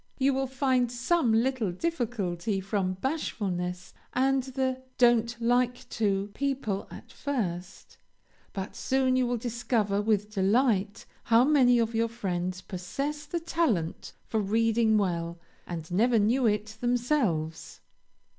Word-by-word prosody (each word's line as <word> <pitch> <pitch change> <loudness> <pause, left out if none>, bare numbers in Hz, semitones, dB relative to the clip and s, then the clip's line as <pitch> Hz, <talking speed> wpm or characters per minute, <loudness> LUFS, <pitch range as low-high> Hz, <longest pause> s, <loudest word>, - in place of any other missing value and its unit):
You 275 0 +3
will 270 0 0
find 260 -2 +1
some 245 +2 +1
little 230 -2 +1
difficulty 210 - -2
from 190 -1 -1
bashfulness, 180 - -3 0.2
and 265 +1 +2
the 260 0 -2 0.2
"don't 235 -1 +3
like 245 +1 +1
to" 200 -2 0
people 265 -8 -2
at - - -11
first, 195 - -4 0.5
but 195 -1 -5
soon 260 -1 +1
you 255 -1 +2
will 245 0 0
discover 225 -3 0
with 210 -1 0
delight 205 0 +1 0.2
how 230 +2 +5
many 260 -4 +5
of 230 -1 +1
your 230 0 +1
friends 185 -5 -3
possess 275 +12 -4
the 340 - -2
talent 320 - -1
for 220 - -1
reading 220 +1 +2
well, 170 -4 -1 0.3
and 165 -1 -6
never 230 +6 +3
knew 230 +4 +3
it 215 0 -1
themselves. 240 - 0
230 Hz, 125 wpm, -28 LUFS, 195-255 Hz, 0.5 s, how